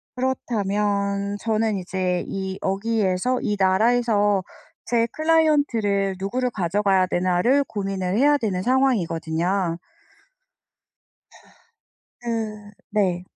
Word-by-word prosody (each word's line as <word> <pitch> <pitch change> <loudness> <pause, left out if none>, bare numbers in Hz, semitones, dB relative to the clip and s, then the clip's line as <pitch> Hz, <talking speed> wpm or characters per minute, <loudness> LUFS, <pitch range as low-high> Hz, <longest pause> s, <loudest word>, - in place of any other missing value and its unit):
그렇다면 205 -5 -1
저는 220 -2 0
이제 180 -1 -2
이 190 0 -4
여기에서 205 +3 0
이 210 - -1
나라에서 205 0 +2 0.4
제 235 -1 +1
클라이언트를 285 -12 +2
누구를 250 +6 -1
가져가야 190 -1 +1
되나를 185 +10 +2
고민을 195 -1 -2
해야 290 +3 +4
되는 200 -7 -2
상황이거든요. 180 -8 0 2.4
그 215 -3 -4 0.2
네. 185 -4 0
205 Hz, 225 characters per minute, -23 LUFS, 190-235 Hz, 2.4 s, 해야